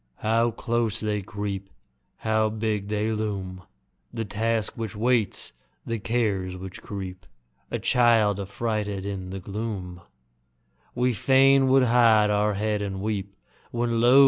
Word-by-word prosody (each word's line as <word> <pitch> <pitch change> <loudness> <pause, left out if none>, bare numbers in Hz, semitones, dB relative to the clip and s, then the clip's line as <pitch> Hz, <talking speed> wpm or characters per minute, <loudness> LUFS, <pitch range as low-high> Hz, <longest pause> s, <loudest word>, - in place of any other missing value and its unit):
How 115 +2 +3
close 115 -1 -1
they 105 -1 -1
creep! 100 0 -5 0.5
How 110 0 +1
big 105 -2 -2
they 105 +1 0
loom! 100 -4 -3 0.5
The 115 - -3
Task 110 +1 0
which 115 -1 -5
waits, 115 - +1 0.3
the 115 -1 -2
Cares 100 -5 -1
which 95 0 -8
creep; 95 -3 -7 0.4
A - - -1
child, 115 -5 +3
affrighted 105 0 -2
in 95 -2 -4
the 95 +1 -5
gloom, 95 -3 -5 0.9
We 125 +1 +2
fain 135 +3 +5
would 130 0 +5
hide 115 -3 +5
our 105 0 +2
head 105 0 0
and 95 -2 -3
weep. 100 -1 -3 0.3
When, 120 -1 0
lo! 125 +3 +7
105 Hz, 135 wpm, -26 LUFS, 100-115 Hz, 0.9 s, lo